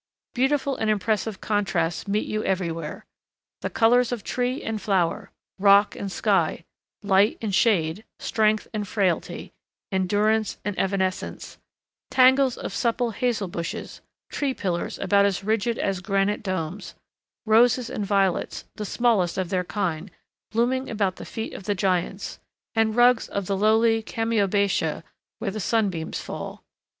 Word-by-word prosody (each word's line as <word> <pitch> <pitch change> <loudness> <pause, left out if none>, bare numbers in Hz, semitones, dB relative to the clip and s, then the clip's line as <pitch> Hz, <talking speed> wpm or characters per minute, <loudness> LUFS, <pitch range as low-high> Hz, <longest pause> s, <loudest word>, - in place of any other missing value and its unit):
Beautiful 270 +1 +1
and 220 - 0
impressive 215 0 0
contrasts 195 -6 -1
meet 205 +2 0
you 215 0 -2
everywhere: 165 -4 -3 0.6
the - - -2
colors 245 +2 +3
of 235 -5 -3
tree 250 +2 -2
and 220 -2 -3
flower, 195 +1 0 0.3
rock 200 +1 +5
and 195 - -5
sky, - - +1 0.4
light 200 +1 +3
and 215 -3 -3
shade, 190 -3 +2
strength 215 -1 +1
and 210 -2 -3
frailty, 185 -4 -1 0.4
endurance 205 +3 +1
and 205 -1 -2
evanescence, 190 -1 -2 0.5
tangles 260 0 +5
of - - -5
supple 235 +2 0
hazel 225 -2 -1
bushes, 170 -1 -6 0.3
tree 275 -3 -1
pillars 175 -3 -2
about 200 +1 +3
as 200 -1 0
rigid 220 +2 0
as 195 -2 -1
granite 195 +1 0
domes, 185 -1 -4 0.5
roses 235 +2 +4
and 210 - -3
violets, 195 -2 0
the 210 - -4
smallest 210 -6 +1
of 185 -2 -1
their 185 -1 0
kind, 180 -2 -3 0.4
blooming 250 +4 0
around 200 -4 -1
the - - -8
feet 225 - -5
of 195 - -9
the 205 - 0
giants, 185 +1 -1 0.3
and 225 -1 +2
rugs 245 -1 +4
of 200 -1 -3
the 195 - -1
lowly 225 +2 +3
chamaebatia 200 -8 0 0.3
where 195 - -3
the 215 - -5
sunbeams 195 -6 -1
fall. - - -7
205 Hz, 140 wpm, -25 LUFS, 190-225 Hz, 0.6 s, rock